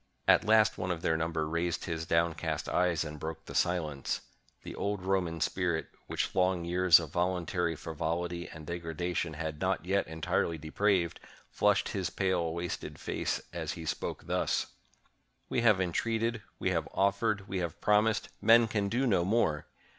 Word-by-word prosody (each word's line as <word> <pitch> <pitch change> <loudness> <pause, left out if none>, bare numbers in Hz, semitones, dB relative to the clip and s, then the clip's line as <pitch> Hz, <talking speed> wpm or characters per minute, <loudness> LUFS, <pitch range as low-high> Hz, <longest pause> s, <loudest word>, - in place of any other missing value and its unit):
At - - +6
last 110 0 +4
one 90 - -2
of 85 -2 -2
their 80 - +2
number 80 -1 -1
raised 85 +2 -1
his 85 -2 -3
downcast 85 0 0
eyes 90 -3 +2
and 75 -1 -7
broke 80 +2 -6
the - - -9
silence. 80 -6 0 0.4
The - - -7
old 100 -2 -2
Roman 90 -3 0
spirit, 85 -1 0 0.2
which - - -2
long 90 -2 +2
years 90 0 +6
of 80 -3 -6
voluntary 90 -1 0
frivolity 85 +3 -3
and 80 -1 -10
degradation 85 0 -3
had 80 -1 -4
not 95 -3 0
yet 100 +2 +1
en 80 0 -8
tirely 80 +2 +1
depraved, 85 +3 0 0.3
flushed - - +2
his 95 -4 -2
pale 90 -2 0
wasted 85 +1 -4
face - - -2
as - - -3
he 80 - -7
spoke - - -3
thus: - - 0 0.4
— - - -44
"We 120 - +1
have 110 -5 +5
entreated, 115 +5 0 0.2
we - - 0
have - - 0
offered, 100 +1 +1
we 95 -1 -2
have 85 -2 -4
prom 105 +1 +4
ised 110 -1 -1
— - - -39
men 115 +1 +6
can 105 -2 -1
do 125 +6 +1
no 95 -8 +3
more 90 -6 +1
90 Hz, 175 wpm, -31 LUFS, 80-100 Hz, 0.4 s, At